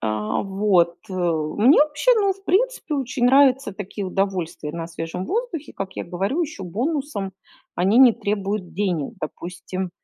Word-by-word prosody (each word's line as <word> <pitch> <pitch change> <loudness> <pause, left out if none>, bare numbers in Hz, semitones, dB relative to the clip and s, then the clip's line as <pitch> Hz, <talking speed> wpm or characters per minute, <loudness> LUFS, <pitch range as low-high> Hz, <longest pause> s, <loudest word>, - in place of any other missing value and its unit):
А, 110 -1 -1
вот, 190 -3 +2 0.2
э, - - -5
мне, 175 - +3
вообще, 305 +12 +2
ну, 400 -3 +2
в 390 +1 -19
принципе, 410 -5 +1
очень 260 -2 -1
нравятся 265 -3 +4
такие 200 0 -6
удовольствия 185 -5 -2
на 165 -1 -4
свежем 165 +2 -5
воздухе. 415 - -3
Как 195 -1 -5
я - - -3
говорю, 195 - -2
еще 300 -10 -5
бонусом 235 - -2 0.4
они 195 +6 +3
не 255 -3 +8
требуют 200 -3 -3
денег. 185 -2 -1
Допустим, 180 +3 -5
200 Hz, 150 wpm, -22 LUFS, 180-275 Hz, 0.4 s, не